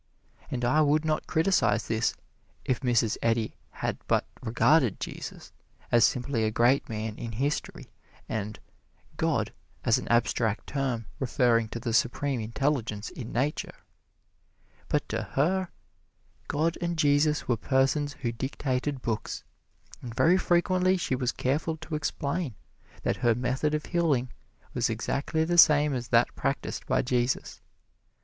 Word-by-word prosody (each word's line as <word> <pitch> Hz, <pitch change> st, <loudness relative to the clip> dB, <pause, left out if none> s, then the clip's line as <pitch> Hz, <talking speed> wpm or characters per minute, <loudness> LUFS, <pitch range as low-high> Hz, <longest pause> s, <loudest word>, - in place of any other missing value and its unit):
And 125 Hz, -1 st, -2 dB
I 155 Hz, +6 st, +4 dB
would 150 Hz, +1 st, +3 dB
not 155 Hz, -1 st, 0 dB
criticize 185 Hz, +4 st, +2 dB
this 110 Hz, +1 st, 0 dB, 0.5 s
if 130 Hz, -, 0 dB
Mrs. 120 Hz, -4 st, +1 dB
Eddy 115 Hz, -1 st, +1 dB, 0.2 s
had -, -, -3 dB
but -, -, +2 dB, 0.2 s
regarded 125 Hz, -, +3 dB
Jesus -, -, -7 dB, 0.4 s
as 120 Hz, -2 st, +5 dB
simply 125 Hz, -1 st, +1 dB
a 110 Hz, -, +2 dB
great 120 Hz, +6 st, +2 dB
man 110 Hz, -1 st, -4 dB
in 115 Hz, -1 st, -5 dB
history 140 Hz, +7 st, -3 dB, 0.4 s
and 105 Hz, -1 st, -4 dB, 0.6 s
"God" -, -, 0 dB, 0.3 s
as -, -, +3 dB
an -, -, -8 dB
abstract 120 Hz, -2 st, +1 dB
term 130 Hz, -5 st, -2 dB
referring 120 Hz, -3 st, +2 dB
to 115 Hz, -, -5 dB
the 115 Hz, -1 st, -3 dB
Supreme 125 Hz, +3 st, +1 dB
Intelligence 115 Hz, -2 st, -1 dB
in 115 Hz, -, -7 dB
Nature. 135 Hz, +6 st, -1 dB, 1.1 s
But -, -, 0 dB
to -, -, -1 dB
her, 185 Hz, +6 st, 0 dB, 0.8 s
God 160 Hz, +3 st, 0 dB
and 170 Hz, -1 st, -1 dB
Jesus 150 Hz, 0 st, +2 dB
were 120 Hz, -, +3 dB
persons 135 Hz, +5 st, +1 dB
who 120 Hz, -, 0 dB
dictated 130 Hz, +2 st, -2 dB
books, 110 Hz, -2 st, -3 dB, 0.6 s
and 120 Hz, -2 st, -7 dB
very 180 Hz, +7 st, +4 dB
frequently 185 Hz, +1 st, +2 dB
she 170 Hz, -, -2 dB
was 125 Hz, -1 st, 0 dB
careful 155 Hz, +5 st, -1 dB
to 160 Hz, +1 st, -9 dB
explain 145 Hz, -, -2 dB, 0.5 s
that -, -, 0 dB
her 120 Hz, -2 st, +3 dB
method 130 Hz, +5 st, 0 dB
of 150 Hz, -, -3 dB
healing 145 Hz, -8 st, +1 dB, 0.4 s
was -, -, +1 dB
exactly 160 Hz, +3 st, -1 dB
the 175 Hz, +1 st, +2 dB
same 150 Hz, -2 st, +6 dB
as 125 Hz, -2 st, -3 dB
that 115 Hz, +1 st, +3 dB
practised 135 Hz, 0 st, -3 dB
by -, -, +2 dB
Jesus. 125 Hz, 0 st, -1 dB
130 Hz, 140 wpm, -28 LUFS, 115-150 Hz, 1.1 s, same